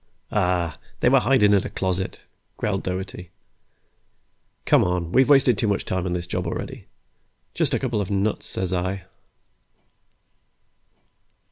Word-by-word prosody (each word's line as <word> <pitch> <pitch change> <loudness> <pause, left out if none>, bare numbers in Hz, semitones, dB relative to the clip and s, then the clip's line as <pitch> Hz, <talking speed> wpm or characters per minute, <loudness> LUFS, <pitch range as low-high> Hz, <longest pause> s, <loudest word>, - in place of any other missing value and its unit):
"Aw, 90 -5 0 0.2
they - - +5
were 135 +1 +6
hidin' 110 -6 +4
in 100 - +3
a - - -5
closet," 95 0 -2 0.4
growled - - -1
Doherty. 90 -1 -5 1.4
"Come - - +5
on, 90 -2 -1
we've 130 +6 +4
wasted 130 -6 +5
too 110 - +1
much 100 -1 0
time 95 0 -2
on 90 - -1
this 90 -1 -2
job 90 - -3
already. - - -5 0.7
Just 145 -6 +1
a - - 0
couple 120 -5 -1
of 95 - -4
nuts, 100 +1 -1
says 95 -1 -2
I." 95 +1 -2
95 Hz, 140 wpm, -24 LUFS, 90-110 Hz, 1.4 s, were